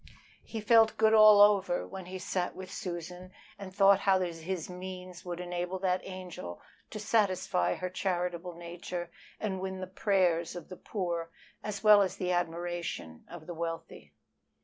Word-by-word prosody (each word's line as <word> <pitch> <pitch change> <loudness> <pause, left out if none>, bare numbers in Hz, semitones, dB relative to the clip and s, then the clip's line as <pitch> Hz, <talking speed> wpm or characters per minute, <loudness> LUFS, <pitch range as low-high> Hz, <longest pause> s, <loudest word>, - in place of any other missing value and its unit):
He 225 - -6
felt 225 +1 +5
good 220 0 +4
all 215 -1 +9
over 200 -3 +4
when 190 -2 -8
he 185 +1 -6
sat 180 0 -2
with 185 0 -8
Susan 180 -1 -6 0.3
and 195 -2 -7
thought 195 0 +5
how 195 -1 +3
his 175 -1 -3
means 180 0 -8
would 175 -1 -5
enable 180 +1 -3
that 185 -1 0
angel 180 - -7 0.3
to - - -7
satisfy 200 -4 +1
her 185 - -3
charitable 180 -2 -2
nature, 175 0 -6 0.3
and 195 -3 -2
win 190 0 -4
the 185 - -4
prayers 185 -3 +1
of 175 - -8
the 185 - -8
poor 170 -5 -3 0.3
as 210 -1 -5
well 210 -1 +8
as 190 - 0
the 180 -1 -1
admiration 175 - -3
of 175 -3 -10
the 175 - -6
wealthy. 165 0 -6
185 Hz, 160 wpm, -30 LUFS, 175-195 Hz, 0.3 s, all